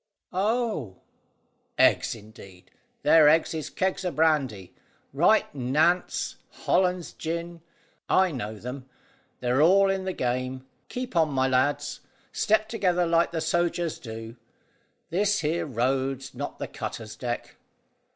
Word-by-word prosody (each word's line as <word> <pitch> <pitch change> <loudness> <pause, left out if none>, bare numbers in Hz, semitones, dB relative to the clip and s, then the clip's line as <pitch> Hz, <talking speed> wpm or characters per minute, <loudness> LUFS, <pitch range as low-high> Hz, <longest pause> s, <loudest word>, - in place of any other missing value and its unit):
"Oh!" 200 - -1 0.8
"Eggs, - - +4
indeed! 100 -4 -15 0.3
Their 155 -2 +7
eggs 160 +2 +3
is 155 -2 -4
kegs 190 +1 -1
o' 180 - 0
brandy. 140 - 0 0.4
Right - - +4
Nantes; 150 +7 +1 0.3
Hollands 180 -2 +1
gin. 170 +1 -5 0.5
I 185 -1 +4
know 110 -6 -5
them. 125 +4 -8 0.5
They're 125 +3 +2
all 195 +4 +5
in 190 -1 -2
the 190 - -2
game. 130 0 -2 0.2
Keep 250 -4 -5
on, 160 -2 +4
my 130 -2 +1
lads. 145 +3 0 0.3
Step 215 0 +2
together 180 -6 +1
like 170 0 +3
the 165 -1 -2
sogers 170 0 0
do. 115 0 -8 0.7
This 200 +3 +1
here 160 +1 -1
road's 130 +1 -1
not 140 +3 -5
the - - -4
cutter's 110 -2 -6
deck." 120 +1 -5
155 Hz, 125 wpm, -26 LUFS, 125-175 Hz, 0.8 s, Their